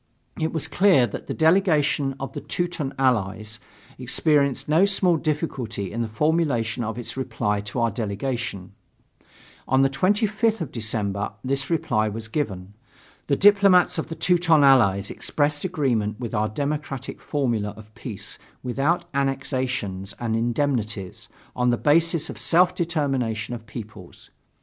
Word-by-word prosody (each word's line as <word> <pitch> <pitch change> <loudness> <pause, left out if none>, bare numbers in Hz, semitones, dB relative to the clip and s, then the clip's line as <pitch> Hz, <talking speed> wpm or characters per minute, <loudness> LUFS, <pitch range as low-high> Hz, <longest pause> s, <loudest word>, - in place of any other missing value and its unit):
It 160 0 0
was 160 -1 -2
clear 170 -4 +4
that 110 - -7
the - - -2
delegation 155 -5 +2
of 135 - -5
the - - -5
Teuton 175 -6 -3
Allies 110 -4 0 0.4
experienced 140 +1 +1
no 160 +5 +4
small 195 -3 +3
difficulty 135 - -3
in 115 - -3
the 115 - -1
formulation 120 -3 0
of 110 +1 -4
its 120 - -4
reply 115 -6 -1
to 105 +4 -5
our 115 -1 +2
delegation. 105 -2 -4 0.9
On 130 +1 +4
the 135 - +2
25th 210 +7 +1
of 165 -7 -4
December 105 -3 -2
this 135 +1 -1
reply 120 -10 +1
was 110 +1 -6
given. 100 -8 -3 0.5
The 140 - +2
diplomats 200 -2 +5
of 160 - -3
the 165 - -6
Teuton 165 -2 +3
Allies 100 -8 +4
expressed 145 0 -1
agreement 125 - -1
with 120 -2 -5
our 105 0 +1
democratic 140 +2 -4
formula 120 -8 -1
of 110 -1 -14
peace 115 -3 -8 0.2
without 135 +7 0
annexations 130 -8 -2
and 115 -2 -1
indemnities, 115 -5 -2 0.3
on 125 0 +2
the 120 - +2
basis 165 +3 +2
of 105 - -8
self 175 +8 +3
determination 135 - -1
of 115 -2 -8
peoples. 105 -5 -10
130 Hz, 140 wpm, -24 LUFS, 110-155 Hz, 0.9 s, diplomats